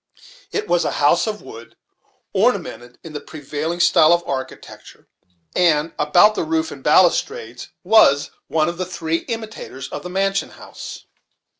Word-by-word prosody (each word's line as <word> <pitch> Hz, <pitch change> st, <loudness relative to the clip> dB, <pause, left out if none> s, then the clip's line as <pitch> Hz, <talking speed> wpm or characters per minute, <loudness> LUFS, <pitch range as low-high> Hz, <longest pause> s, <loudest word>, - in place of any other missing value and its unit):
It 425 Hz, -, -3 dB
was 175 Hz, 0 st, +2 dB
a -, -, -1 dB
house 145 Hz, +8 st, +2 dB
of 210 Hz, -1 st, -4 dB
wood, 115 Hz, +1 st, -12 dB, 0.6 s
ornamented 120 Hz, 0 st, -1 dB
in 165 Hz, -, -10 dB
the 150 Hz, -, -4 dB
prevailing 155 Hz, +3 st, -5 dB
style 175 Hz, -2 st, +5 dB
of 175 Hz, 0 st, +1 dB
architecture, 130 Hz, -1 st, -7 dB, 0.5 s
and 165 Hz, -2 st, +2 dB
about 175 Hz, +8 st, +5 dB
the -, -, -2 dB
roof 320 Hz, 0 st, -1 dB
and -, -, -10 dB
balustrades 460 Hz, +2 st, +2 dB
was 145 Hz, -11 st, +4 dB, 0.2 s
one 155 Hz, -1 st, +1 dB
of 170 Hz, +1 st, -4 dB
the 185 Hz, -, -1 dB
three 165 Hz, -3 st, -2 dB
imitators 220 Hz, -, -6 dB
of -, -, -6 dB
the 180 Hz, -, -7 dB
mansion 195 Hz, +1 st, 0 dB
house. -, -, -10 dB
170 Hz, 150 wpm, -20 LUFS, 150-195 Hz, 0.6 s, style